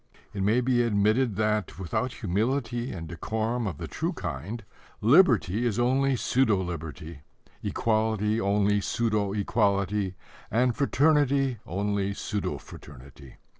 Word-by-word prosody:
It 100 - -3
may 110 +6 +3
be 125 -1 +2
admitted 110 +1 +2
that, 110 0 0
without 95 +7 -2
humility 120 +4 -1
and 85 -3 -6
decorum 110 +7 -2
of 85 -7 -4
the - - -6
true - - -3
kind, 100 - -5 0.4
liberty 120 - +4
is 115 -4 0
only 130 +2 +2
pseudo 120 -3 +2
liberty, 80 -3 -6 0.4
equality 110 -1 0
only 100 0 +2
pseudo 105 -2 0
equality, 100 -1 0 0.3
and 120 +2 +2
fraternity 140 -3 +2
only 100 +1 -1
pseudo 105 -1 -3
fraternity. 70 -1 -13
105 Hz, 120 wpm, -27 LUFS, 100-120 Hz, 0.4 s, liberty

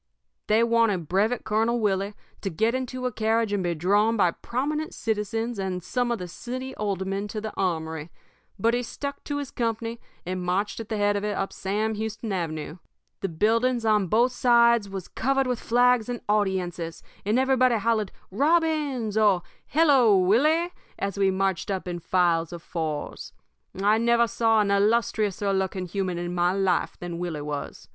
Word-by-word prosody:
"They 220 +2 +4
wanted 230 -8 +2
Brevet 215 +7 +1
Colonel 225 +3 +1
Willie 200 -1 0 0.3
to 195 - -2
get 220 +7 +1
into 255 0 -3
a 250 - 0
carriage 220 -1 +1
and 200 - +1
be 175 -1 -1
drawn 205 +7 +2
by 180 -4 +4
prominent 300 - -3
citizens 225 +1 -2
and 185 -2 -3
some 245 +6 -1
of 235 - 0
the 180 -3 -6
city 255 +8 -6
aldermen 195 0 -2
to 215 +1 -5
the 215 0 -5
armory, 160 -4 -2 0.5
but 230 +4 +2
he 245 - +1
stuck 280 +4 -6
to 290 - -2
his 285 -3 -5
company 230 0 -2 0.3
and 185 +1 -3
marched 185 +5 -1
at 225 - -7
the 220 - -1
head 205 0 +2
of 200 - -2
it 210 0 -2
up 195 - -2
Sam 210 +3 -1
Houston 220 +1 -4
Avenue. 165 -2 -3 0.4
The 195 - -2
buildings 230 +7 +1
on 210 -3 +3
both 235 +7 +3
sides 235 -3 +4
was 195 -2 -6
covered 270 +2 0
with 250 -2 -1
flags 245 -1 +3
and 240 -1 -3
audiences, 185 -5 -1 0.2
and 210 +4 +1
everybody 255 -2 +3
hollered 220 -2 0 0.2
'Robbins!' 290 - +1
or 200 -5 +4 0.2
'Hello, 270 -9 +5
Willie!' 305 - +3 0.2
as 200 0 -3
we 195 -1 +4
marched 190 -1 -1
up 190 -1 -2
in 175 -1 -3
files 170 -1 +1
of 170 -1 -8
fours. 155 -4 -4 0.5
I 210 +3 +3
never 235 0 +4
saw 225 -1 +2
a - - +2
illustriouser 205 -1 +1
looking 190 -1 -1
human 185 -1 -2
in 175 0 -3
my 175 +1 +2
life 190 -3 0
than 175 -1 -6
Willie 170 -4 -3
was. 145 -1 -6
210 Hz, 175 wpm, -26 LUFS, 185-235 Hz, 0.5 s, Hello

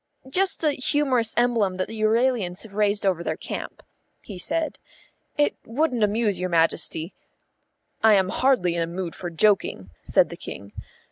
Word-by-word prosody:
"Just 380 +2 +1
a 305 - +4
humorous 260 -4 +1
emblem 235 -6 +2
that 185 0 -2
the 220 -1 -6
Euralians 220 -4 +1
have 220 -3 -13
raised 205 0 +1
over 180 -3 +1
their - - -2
camp," - - -7 0.4
he 195 -4 -9
said. 320 - -2 0.6
"It 295 0 +2
wouldn't 250 -1 0
amuse 210 -2 +1
your 185 0 -2
Majesty." 165 0 0 0.9
"I 220 -1 +7
am 190 -1 +2
hardly 245 -8 +2
in 170 - -1
a 165 - 0
mood 175 0 -5
for 175 - -5
joking," 165 - +1
said - - +2
the - - -8
King. 100 0 -8
210 Hz, 160 wpm, -24 LUFS, 180-245 Hz, 0.9 s, I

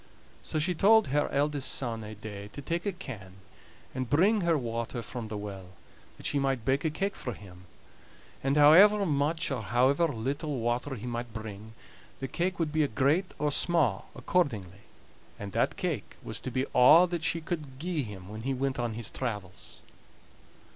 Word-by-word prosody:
So - - -3
she 165 +4 +1
told 215 +2 +5
her 145 +2 +1
eldest 145 -1 0
son 115 -4 -3
ae 105 0 -8
day 105 -1 -8
to 140 - -7
take 170 +6 -2
a - - +1
can 115 - -9 0.6
and 130 -2 -3
bring 195 - +4
her 170 -2 +2
water 115 -1 -3
from 110 +2 -6
the 105 -1 -5
well, 95 -3 -8 0.4
that - - -12
she 145 - +1
might 135 -4 -1
bake 135 +3 +1
a 160 - +2
cake 195 +6 -2
for 125 - -4
him; 90 -3 -13 0.8
and 135 +2 +1
however 195 +8 +7
much 155 +2 0
or 130 -4 -1
however 130 +9 +3
little 145 +3 -3
water 120 +4 -1
he 115 0 -8
might 120 -1 -4
bring, 110 0 -7 0.5
the 135 - -3
cake 175 +7 -1
would 160 -3 -1
be 155 -1 +2
great 140 - +1
or 150 0 0
sma' 145 - +2
accordingly; 110 - -1 0.6
and 100 -1 -7
that - - 0
cake - - -3
was - - -4
to - - -5
be 130 +2 -1
a' 150 +8 +8
that 175 -2 -3
she 165 - +1
could 155 -5 -5
gie 170 -1 -1
him 100 -6 -8
when 110 +2 -7
he 135 +3 -1
went 135 0 -1
on 120 -2 -1
his 115 -2 -6
travels. 105 -8 -6
135 Hz, 180 wpm, -29 LUFS, 110-155 Hz, 0.8 s, a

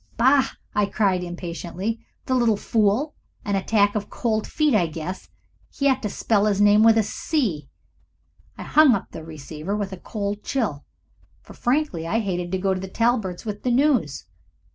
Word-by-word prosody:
"Bah!" 265 +3 +4 0.2
I 210 -1 +2
cried, 195 -4 +1
impatiently. 175 +4 -5 0.2
"The 260 - -1
little 235 -4 +3
fool! 225 +9 +1 0.3
An 200 - 0
attack 205 +1 +2
of 210 -2 -3
cold 220 -2 -1
feet, 305 -3 +1
I 185 -6 +3
guess 165 +4 -6 0.4
he 280 - -1
ought 265 -1 +2
to 210 - -2
spell 210 +1 +1
his 200 -2 +1
name 205 +1 +6
with 225 0 +6
a 220 - +4
C." 205 - -2 0.9
I - - -6
hung 300 -6 +5
up 195 - -6
the 160 - -8
receiver 155 +4 -6
with 200 -2 -3
a - - -6
cold 205 +2 -4
chill, 215 - -2 0.6
for - - -13
frankly 245 - -1
I 210 - 0
hated 180 -5 -2
to 190 - 0
go 190 +1 +1
to 185 - -3
the 190 - -6
Talberts' 220 -3 0
with 205 -1 -5
the 250 - -1
news. 245 - +1
205 Hz, 180 wpm, -23 LUFS, 185-235 Hz, 0.9 s, name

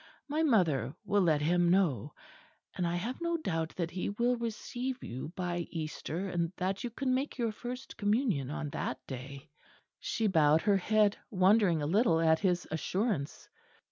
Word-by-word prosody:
My 300 +2 0
mother 160 - +2
will 205 0 +2
let 160 -5 +3
him 175 +2 +3
know; 150 - +1 0.6
and 180 - -1
I 170 - -1
have 235 - -3
no 340 0 0
doubt 165 - -2
that 170 -2 -2
he 185 - -2
will 240 +4 +1
receive 240 +2 -4
you 130 +6 -6
by 175 -2 -2
Easter, 165 +2 -4
and 170 -2 -1
that 190 +2 -2
you 245 - -2
can 255 +3 -1
make 265 +2 -1
your 230 -3 0
First 250 +4 -7
Communion 205 - +1
on 150 0 -4
that 130 - -3
day." 135 +2 -8 0.5
She 225 - -2
bowed 160 -5 +4
her 205 -2 +4
head, 210 +1 +2
wondering 185 -4 +4
a - - 0
little 170 0 +3
at 160 -1 +4
his 180 -3 0
assurance. 180 - -2
185 Hz, 170 wpm, -31 LUFS, 160-225 Hz, 0.6 s, bowed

